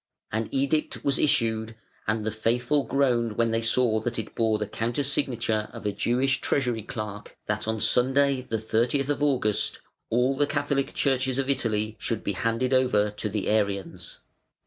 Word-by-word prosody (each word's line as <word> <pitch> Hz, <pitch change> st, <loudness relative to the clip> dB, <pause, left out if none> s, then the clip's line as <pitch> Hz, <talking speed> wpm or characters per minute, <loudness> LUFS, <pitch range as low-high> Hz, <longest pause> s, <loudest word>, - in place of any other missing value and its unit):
An 110 Hz, 0 st, -2 dB
edict 140 Hz, +3 st, 0 dB
was 140 Hz, -, +2 dB
issued 110 Hz, -5 st, +1 dB, 0.3 s
and 110 Hz, 0 st, 0 dB
the 110 Hz, -, 0 dB
faithful 120 Hz, +6 st, +1 dB
groaned 120 Hz, -5 st, +1 dB
when 115 Hz, -1 st, +2 dB
they 115 Hz, 0 st, +1 dB
saw 115 Hz, -1 st, +2 dB
that 115 Hz, +1 st, -3 dB
it 110 Hz, -, -5 dB
bore 110 Hz, -1 st, +1 dB
the 105 Hz, -, -2 dB
counter 120 Hz, +7 st, -2 dB
signature 120 Hz, -6 st, 0 dB
of -, -, -9 dB
a 105 Hz, -, +1 dB
Jewish 125 Hz, +6 st, +1 dB
Treasury 125 Hz, -5 st, 0 dB
clerk 105 Hz, -1 st, -7 dB
that 105 Hz, +1 st, -2 dB
on 110 Hz, 0 st, 0 dB
Sunday 135 Hz, +3 st, +3 dB
the 120 Hz, -3 st, -3 dB
30th 120 Hz, +6 st, 0 dB
of 145 Hz, -, 0 dB
August 125 Hz, -8 st, +1 dB, 0.3 s
all 125 Hz, +4 st, +2 dB
the 145 Hz, +1 st, +2 dB
Catholic 145 Hz, -2 st, -1 dB
churches 130 Hz, -2 st, +1 dB
of 135 Hz, 0 st, +1 dB
Italy 110 Hz, -4 st, -1 dB
should 115 Hz, -2 st, -3 dB
be 100 Hz, -, -1 dB
handed 115 Hz, +6 st, 0 dB
over 105 Hz, -5 st, +3 dB
to 105 Hz, +1 st, -4 dB
the 105 Hz, -1 st, -2 dB
Arians. 100 Hz, -3 st, -1 dB
115 Hz, 170 wpm, -26 LUFS, 110-135 Hz, 0.3 s, Sunday